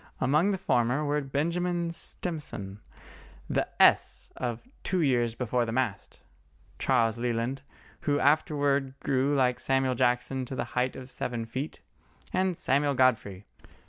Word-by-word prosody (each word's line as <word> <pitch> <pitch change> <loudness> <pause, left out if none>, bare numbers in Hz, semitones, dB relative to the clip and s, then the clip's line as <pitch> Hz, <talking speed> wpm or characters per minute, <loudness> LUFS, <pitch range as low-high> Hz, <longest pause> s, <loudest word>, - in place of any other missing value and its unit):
Among 150 +9 +3
the 195 - 0
former 125 -1 +1
were 145 +1 +1
Benjamin 170 +5 -1
Stimson, 150 - -6 0.7
the - - 0
"S" - - +4
of 120 - -4
Two 185 -2 0
Years 120 -6 +2
Before 125 0 0
the 115 - -3
Mast; 120 -4 -2 0.6
Charles 115 0 +2
Leland, 120 +2 -1 0.4
who 145 -1 +1
afterwards 145 -2 +2
grew 140 +1 +1
like 125 -2 +2
Samuel 135 -1 +1
Jackson 125 +1 +1
to 130 - -6
the - - -1
height 125 +1 0
of 130 - -8
seven 120 -3 -3
feet; 130 +7 -5 0.5
and 185 -2 +1
Samuel 140 +1 +1
Godfrey. 110 -7 +1
130 Hz, 135 wpm, -28 LUFS, 120-145 Hz, 0.7 s, S